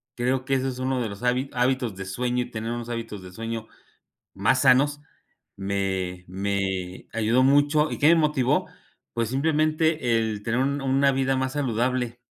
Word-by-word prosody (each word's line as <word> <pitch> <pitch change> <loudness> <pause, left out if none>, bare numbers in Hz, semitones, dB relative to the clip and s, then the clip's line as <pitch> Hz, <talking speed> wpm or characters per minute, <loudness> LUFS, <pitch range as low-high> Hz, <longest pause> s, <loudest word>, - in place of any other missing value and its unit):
Creo 130 +2 0
que 135 - +1
ese 135 0 0
es 130 0 -6
uno 130 -1 0
de 110 - -2
los 100 +4 -9
há 125 - +4 0.2
hábitos 125 -3 0
de 95 - -6
sueño 125 +5 -1
y - - -12
tener 110 +1 -4
unos 120 0 -5
hábitos 115 -4 -5
de 90 -1 -11
sueño 115 +2 -5 0.7
más 105 +7 +2
sanos. 140 +3 +4 0.6
Me 95 -2 -2
me 95 -1 -3
ayudó 115 +3 +2
mucho. 145 +3 +4
¿y - - -4
qué 150 - +5
me 170 - +6
motivó?, 150 -5 +2 0.5
pues 115 -2 0
simplemente 155 -2 +1
el 110 -2 -2
tener 115 +3 -1
un 140 +2 0
una 135 +1 +3
vida 135 0 +1
más 130 0 -1
saludable. 125 -2 -1
125 Hz, 175 wpm, -25 LUFS, 110-135 Hz, 0.7 s, me